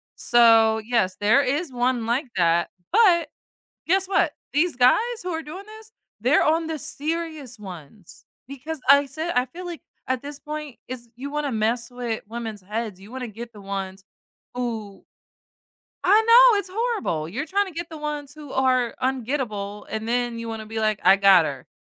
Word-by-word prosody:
So, 225 -2 +5
yes, 215 -5 0
there 220 +7 +4
is 285 +4 -1
one 245 -1 0
like 255 +4 0
that, 170 -1 +2 0.2
but 360 -7 +5 0.6
guess 380 +2 +2
what? 370 -5 +2 0.2
These 325 -2 +2
guys 250 0 +6 0.3
who 365 - -4
are 325 -1 -3
doing 365 +7 -9
this, 440 +1 -13 0.3
they're 255 +7 +4
on 320 +1 +2
the 320 -1 -3
serious 305 -5 -4
ones, 185 -1 -12 0.2
because 280 +2 -6
I 280 +1 +7
said 315 +5 -3
I 250 0 +3
feel 355 +8 -9
like 345 -2 -7 0.2
at 255 0 -1
this 290 0 -7
point 300 -3 -7
is 240 -2 -7
you 280 +3 -6
wanna 295 -3 -2
mess 230 +2 0
with 240 -3 -4
women's 225 -3 -6
heads, 210 -1 -4
you 200 +3 -13
wanna 255 -2 -5
get 230 +2 -9
the 205 - -13
ones 195 -1 -5 0.5
who 225 -5 -5 1.0
I 415 +4 +6
know 470 -2 +8
it's 380 -2 -4
horrible, 425 - -1
you're 255 - -3
tryna 390 0 0
get 340 0 -5
the 315 - -8
ones 295 -1 -5
who 295 -3 -10
are 255 -2 +2
ungettable 230 -6 -2
and 220 +1 -4
then 240 -1 -1
you 230 0 -6
wanna 225 -1 -5
be 220 0 -4
like, 215 -1 +1
"I 190 +2 +7
got 195 -4 +6
her." 140 -3 -5
250 Hz, 175 wpm, -24 LUFS, 220-310 Hz, 1.0 s, know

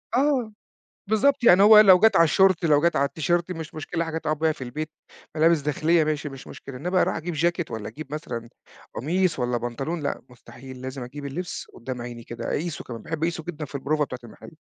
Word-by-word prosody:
آه. 255 -5 +1 0.6
بالضبط 265 +5 +2
يعني 195 -4 +7
هو 210 +1 +9
لو 190 -4 +8
جات 220 +2 +5
على 165 - +7
الشورت، 185 +2 +3
لو 150 -2 +4
جات 170 +1 +2
على 140 - +3
التيشيرت 170 +5 -1
مش 160 -3 -6
مشكلة، 165 +2 -3
حاجة 160 0 -3
تُقعُد 155 -2 -2
بيها 160 0 +2
في 140 - -7
البيت، 150 +6 -5 0.5
ملابس 160 0 +4
داخلية 155 +3 +2
ماشي، 150 -1 -2
مش 135 -1 -11
مشكلة، 135 -2 -9
إنما 180 +7 +1
أروح - - +1
أجيب 170 +2 -4
جاكيت 170 +2 0
والّا 110 -2 -5
أجيب 150 -1 -9
مثلًا 120 -6 -5 0.5
قميص 170 +3 0
والّا 125 -1 0
بنطلون 130 +8 -4
لأ - - -2
مستحيل، 125 +1 -12
لازم 130 0 -6
أجيب 140 +4 -8
اللبس 175 +6 -5
قُدّام 125 0 -6
عيني 120 -1 -7
كده، 115 0 -7
أقيسه 165 +1 -3
كمان، 115 -2 -8
باحب 160 -1 -4
أقيسه 165 -1 -1
جدًا 155 -2 -6
في 145 - -11
البروفة 150 +2 0
بتاعة 130 -3 -6
المحل. 120 +7 -13
155 Hz, 210 wpm, -25 LUFS, 135-175 Hz, 0.6 s, هو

